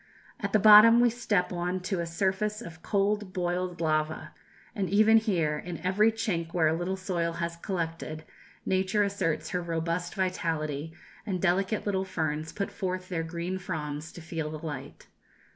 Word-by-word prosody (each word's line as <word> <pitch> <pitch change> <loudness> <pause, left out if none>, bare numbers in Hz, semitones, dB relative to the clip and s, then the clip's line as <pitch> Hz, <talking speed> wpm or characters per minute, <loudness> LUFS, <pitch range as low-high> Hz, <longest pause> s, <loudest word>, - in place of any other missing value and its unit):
At 200 -3 -3
the 215 - +5
bottom 215 +2 +9
we 240 -1 +5
step 210 -6 0
on 180 +1 -1
to 180 0 -2
a 170 - -2
surface 195 +5 -1
of 170 -8 -10
cold 205 -1 0
boiled 180 0 -2
lava, 155 -1 -1 0.4
and 195 -3 -2
even 215 +3 +6
here, 170 -9 +1
in 175 0 -6
every 210 +4 +4
chink 170 -7 -3
where 165 -3 +4
a 155 - +2
little 175 +3 -2
soil 175 -3 -2
has 170 0 -3
collected, 165 -3 -4 0.4
Nature 190 +2 +2
asserts 180 -6 -1
her 180 - -1
robust 170 +1 -2
vitality, 160 -5 -2 0.3
and 190 -4 -2
delicate 195 +4 +1
little 190 -2 0
ferns 160 -4 -2
put 200 - -3
forth 185 -1 -4
their 170 -3 -1
green 170 +3 -4
fronds 155 -3 -5
to 175 - -10
feel 160 -1 -4
the 155 +1 -7
light. 140 -3 -7
180 Hz, 165 wpm, -28 LUFS, 165-195 Hz, 0.4 s, bottom